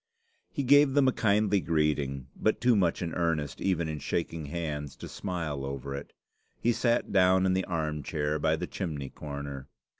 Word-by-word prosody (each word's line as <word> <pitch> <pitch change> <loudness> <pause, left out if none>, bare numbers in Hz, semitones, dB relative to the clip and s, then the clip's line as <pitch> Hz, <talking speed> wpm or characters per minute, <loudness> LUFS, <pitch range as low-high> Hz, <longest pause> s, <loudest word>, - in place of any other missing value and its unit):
He 140 - -2
gave 145 +1 +6
them 140 -2 +5
a - - +5
kindly 105 -3 +2
greeting, 75 -6 0
but 110 - +1
too 125 -1 +4
much 90 -3 +1
in 85 - -3
earnest 80 -4 -1
even 85 -4 +1
in 75 -1 -4
shaking 80 0 -2
hands 75 -3 -4
to - - -8
smile 80 -8 -4
over 70 0 -4
it. 70 +1 -6 0.5
He 120 - +2
sat 120 0 +1
down 95 -1 +4
in 95 - +3
the 95 0 0
arm 80 -3 -2
chair 75 0 -1
by - - +2
the - - -3
chimney 75 -7 -4
corner. 70 -2 -7
80 Hz, 180 wpm, -29 LUFS, 75-95 Hz, 0.5 s, gave